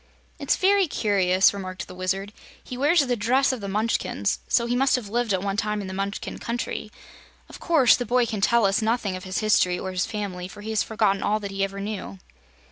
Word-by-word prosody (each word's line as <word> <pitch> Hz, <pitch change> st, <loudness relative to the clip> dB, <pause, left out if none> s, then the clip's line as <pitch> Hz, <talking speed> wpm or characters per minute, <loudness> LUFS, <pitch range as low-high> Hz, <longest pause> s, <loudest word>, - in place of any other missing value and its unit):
"It's -, -, +1 dB
very 390 Hz, -1 st, +3 dB
curious," 190 Hz, -7 st, +3 dB
remarked 185 Hz, -2 st, -6 dB
the -, -, -10 dB
Wizard. 190 Hz, +3 st, -3 dB, 0.3 s
"He 250 Hz, -, -7 dB
wears 290 Hz, +4 st, +3 dB
the 250 Hz, -1 st, 0 dB
dress 250 Hz, +6 st, +2 dB
of 255 Hz, -4 st, -5 dB
the 200 Hz, -, -5 dB
Munchkins, 215 Hz, +4 st, -1 dB
so 235 Hz, -, +2 dB
he 240 Hz, +1 st, -1 dB
must 270 Hz, +2 st, +3 dB
have 235 Hz, -5 st, -4 dB
lived 240 Hz, 0 st, 0 dB
at 190 Hz, -1 st, 0 dB
one 200 Hz, 0 st, -2 dB
time 210 Hz, 0 st, -1 dB
in 200 Hz, -, -5 dB
the 190 Hz, -, -6 dB
Munchkin 200 Hz, +1 st, -4 dB
Country. 235 Hz, -2 st, -4 dB, 0.6 s
Of -, -, -12 dB
course 310 Hz, -8 st, +4 dB
the 245 Hz, -, -2 dB
boy 245 Hz, +1 st, +2 dB
can 215 Hz, -3 st, -4 dB
tell 235 Hz, +2 st, +3 dB
us 195 Hz, +3 st, +2 dB
nothing 220 Hz, -3 st, 0 dB
of 185 Hz, -, -8 dB
his 185 Hz, +3 st, -2 dB
history 180 Hz, -4 st, +3 dB
or 190 Hz, +1 st, -4 dB
his 185 Hz, 0 st, -1 dB
family, 195 Hz, -4 st, -5 dB
for 200 Hz, +3 st, -12 dB
he 220 Hz, +1 st, -5 dB
has 220 Hz, -, +1 dB
forgotten 210 Hz, -3 st, 0 dB
all 215 Hz, +1 st, +1 dB
that 200 Hz, -2 st, -6 dB
he 195 Hz, 0 st, -1 dB
ever 195 Hz, 0 st, -3 dB
knew." 200 Hz, -, -5 dB
210 Hz, 225 wpm, -24 LUFS, 195-235 Hz, 0.6 s, course